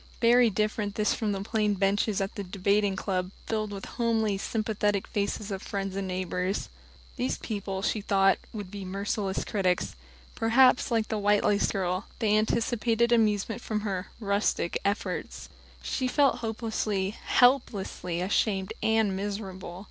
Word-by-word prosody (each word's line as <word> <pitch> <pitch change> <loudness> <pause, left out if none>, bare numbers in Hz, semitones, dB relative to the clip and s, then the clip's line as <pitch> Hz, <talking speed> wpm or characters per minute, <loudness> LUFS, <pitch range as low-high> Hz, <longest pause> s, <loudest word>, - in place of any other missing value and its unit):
Very 240 0 +5
different 210 0 -1
this 210 -1 +2
from 215 -3 -1
the 195 -1 -2
plain 210 -1 +1
benches 200 +1 +1
at 195 - -2
the 200 - -5
Debating 200 +1 +1
Club, 185 -2 -2 0.2
filled 215 -2 -2
with 195 -1 -6
the - - -7
homely, 225 -3 +1
sympathetic 210 -1 -1
faces 205 0 -2
of 190 -1 -3
friends 195 -1 -4
and 195 -1 -2
neighbors. 185 +1 -2 0.5
These 250 +1 -1
people, 195 -3 -4
she 215 - 0
thought, 195 -1 +3
would 205 -4 -7
be 200 -1 -6
merciless 195 +1 -2
critics. 185 -4 0 0.4
Perhaps, 250 +3 +4
like 225 -2 0
the 215 - -1
white 205 0 +3
lace 205 -1 +2
girl, 185 +1 -1
they 215 -3 +2
anticipated 230 +1 +1
amusement 220 0 +2
from 215 -3 -2
her 195 -3 -3
"rustic" 200 -4 0
efforts. 200 +1 -3 0.3
She 260 - -1
felt 275 +2 +3
hopelessly, 220 -3 -2
helplessly 215 -8 +1
ashamed 190 0 0
and 220 -3 +2
miserable. 190 -3 -5
205 Hz, 150 wpm, -28 LUFS, 195-220 Hz, 0.5 s, Very